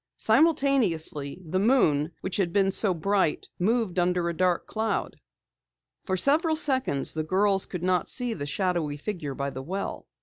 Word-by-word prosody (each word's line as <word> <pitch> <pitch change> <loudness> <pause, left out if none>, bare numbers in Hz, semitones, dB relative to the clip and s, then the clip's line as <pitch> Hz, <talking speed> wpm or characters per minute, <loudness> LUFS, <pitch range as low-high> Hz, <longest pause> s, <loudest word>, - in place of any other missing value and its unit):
Simultaneously, 215 - +2
the 185 +4 -1
moon, 175 - +2
which 190 - -3
had 185 -4 0
been 195 +1 +2
so 195 0 +3
bright, 185 -1 0
moved 210 -1 0
under 180 0 +1
a - - -2
dark 180 0 +1
cloud. 220 0 -2 0.9
For 190 -1 -1
several 315 - +3
seconds 260 - 0
the 155 - -2
girls 195 +3 +2
could 180 -2 -6
not 180 -1 0
see 245 -3 -1
the 145 -8 -5
shadowy 170 -3 -1
figure 150 -5 -5
by 140 0 -3
the 130 - -6
well. 190 +8 -5
185 Hz, 160 wpm, -26 LUFS, 160-220 Hz, 0.9 s, so